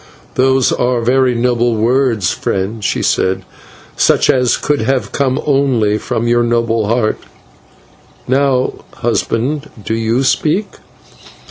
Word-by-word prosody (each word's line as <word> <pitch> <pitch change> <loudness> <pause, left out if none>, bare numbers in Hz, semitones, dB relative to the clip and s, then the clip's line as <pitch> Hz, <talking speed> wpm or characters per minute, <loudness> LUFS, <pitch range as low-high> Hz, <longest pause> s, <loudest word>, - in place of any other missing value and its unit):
"Those 130 0 +2
are 125 0 0
very 125 +1 +2
noble 120 -1 +1
words, 115 -3 +1
friend," 100 +3 -3
she - - -1
said, 95 0 0 0.5
"such - - +3
as 125 -2 +1
could 145 -3 -1
have 130 +3 -1
come 135 -1 0
only 130 -7 +1
from 115 +2 -2
your 120 0 +3
noble 115 -2 0
heart. 115 -1 0 1.1
Now, 130 -1 +1 0.2
husband, 125 +5 -1 0.2
do - - -2
you 115 +3 0
speak?" 170 +9 +1
120 Hz, 120 wpm, -15 LUFS, 115-135 Hz, 1.1 s, such